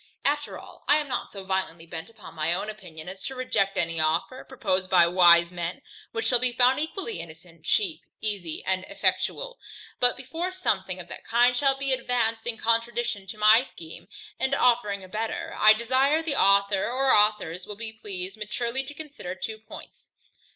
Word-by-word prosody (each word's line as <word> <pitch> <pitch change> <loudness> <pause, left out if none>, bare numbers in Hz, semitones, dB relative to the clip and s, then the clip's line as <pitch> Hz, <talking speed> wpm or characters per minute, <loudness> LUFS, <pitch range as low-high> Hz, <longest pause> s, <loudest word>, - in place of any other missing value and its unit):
After 290 +1 -1
all, - - -14
I 290 - +6
am 300 -1 -2
not 265 - -3
so 195 -2 -9
violently 190 -3 -3
bent 165 +3 -8
upon 220 -4 -13
my 160 +1 0
own 210 +4 -3
opinion, 180 -7 -12
as 190 +1 -9
to 265 - -6
reject 195 -6 0
any 165 -2 0
offer, 165 +11 0
proposed 190 -8 -2
by 175 -2 +6
wise 170 -1 +6
men, 175 0 -5 0.3
which 225 0 -3
shall 245 +1 +3
be 250 0 +1
found 255 +3 +4
equally 390 +8 -4
innocent, 165 0 -12
cheap, 365 - +1 0.2
easy, 200 -7 -3
and 185 0 +1
effectual. - - -1 0.4
But 245 0 +4
before 325 +8 -4
something 190 - -1
of 175 - -8
that - - -9
kind 245 +2 +3
shall 270 +1 +3
be 275 -1 0
advanced 235 -3 -1
in 235 -2 -2
contradiction 230 -3 0
to 215 - -7
my 215 +2 +6
scheme, 165 -11 -11 0.3
and 265 +1 +1
offering 230 -7 +2
a - - -11
better, 220 +4 -4
I 215 0 +7
desire 260 +7 +2
the 315 -3 -1
author 200 -2 +4
or 265 +2 +2
authors 205 -4 +2
will 210 - -7
be 220 +1 -6
pleased 195 -2 -6
maturely 235 +4 -3
to 290 +2 -9
consider 285 - -7
two 220 +3 -6
points. 220 - -13
215 Hz, 185 wpm, -26 LUFS, 185-255 Hz, 0.4 s, I